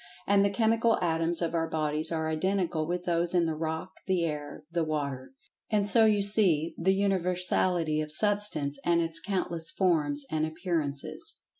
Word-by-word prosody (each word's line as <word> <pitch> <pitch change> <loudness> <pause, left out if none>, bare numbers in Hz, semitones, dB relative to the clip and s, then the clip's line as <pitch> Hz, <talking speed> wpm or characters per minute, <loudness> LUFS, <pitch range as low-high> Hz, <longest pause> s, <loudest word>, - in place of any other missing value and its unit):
And 200 0 +3
the 200 - +2
chemical 225 +2 +2
atoms 165 0 0
of 165 - -2
our 165 -1 -1
bodies 155 0 0
are 160 -1 -1
identical 165 -1 -1
with 175 +1 -3
those 170 0 +1
in 175 -1 +3
the 160 - -1
rock, 160 +1 -4 0.2
the 185 -3 +1
air, 150 -1 -5
the 170 -1 0
water. 145 - -4 0.3
And 205 -2 +1
so 220 +3 +5
you 210 -2 +4
see 185 -6 +2
the 190 +3 +1
universality 180 -4 0
of 155 0 -5
Substance 200 -6 +2
and 170 -1 +2
its 165 0 +1
countless 170 -3 -3
forms 150 -6 +1
and 155 0 0
appearances. 160 -3 -3
170 Hz, 165 wpm, -28 LUFS, 155-190 Hz, 0.3 s, so